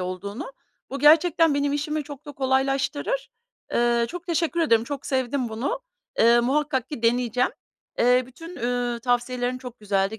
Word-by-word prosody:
olduğunu. 200 - -5 0.4
Bu 275 - -4
gerçekten 320 +1 +5
benim 285 0 +1
işimi 300 +1 -2
çok 290 +1 -10
da 290 - -7
kolaylaştırır. 270 - 0 0.4
Eee, 235 0 +2
çok 355 0 -8
teşekkür 335 0 0
ederim, 230 -8 +3
çok 280 0 -6
sevdim 260 -2 -1
bunu. 260 - -3 0.4
Eee, 235 +1 +6
muhakkak 265 0 0
ki 295 -7 -7
deneyeceğim. 245 +1 +2 0.5
Eee, 250 +1 +4
bütün, 330 +7 -11
üüü, 245 0 -1
tavsiyelerin 245 +1 0
çok 250 -2 -10
güzeldi. 200 +1 0
260 Hz, 145 wpm, -24 LUFS, 240-295 Hz, 0.5 s, Eee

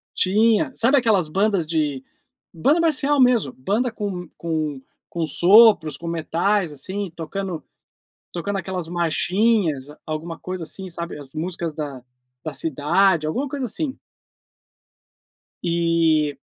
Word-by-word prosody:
Tinha, 220 +8 +3
sabe 265 +5 +4
aquelas 205 -9 +2
bandas 195 0 +1
de 150 -4 -1 0.5
banda 285 - +2
marcial 295 -3 +2
mesmo, 240 - +3
banda 215 - -1
com 195 -5 -5
com 155 -4 -3 0.3
com 170 -2 -2
sopros, 175 - +5
com 170 - -9
metais, 170 +2 0
assim, 190 +7 -4
tocando 175 +1 -5 0.7
tocando 195 +3 -3
aquelas 185 -2 -4
marchinhas, 175 - +1 0.2
alguma 160 +1 -5
coisa 185 -1 -5
assim, 190 +4 -4
sabe, 170 -1 -5
as 135 -2 -9
músicas 170 -1 -3
da 145 -4 -6 0.4
da 155 - -5
cidade, 155 +3 +2
alguma 260 - -2
coisa 275 -1 -3
assim. 270 +5 -2 1.7
E 165 -3 +2
175 Hz, 120 wpm, -22 LUFS, 155-210 Hz, 1.7 s, sopros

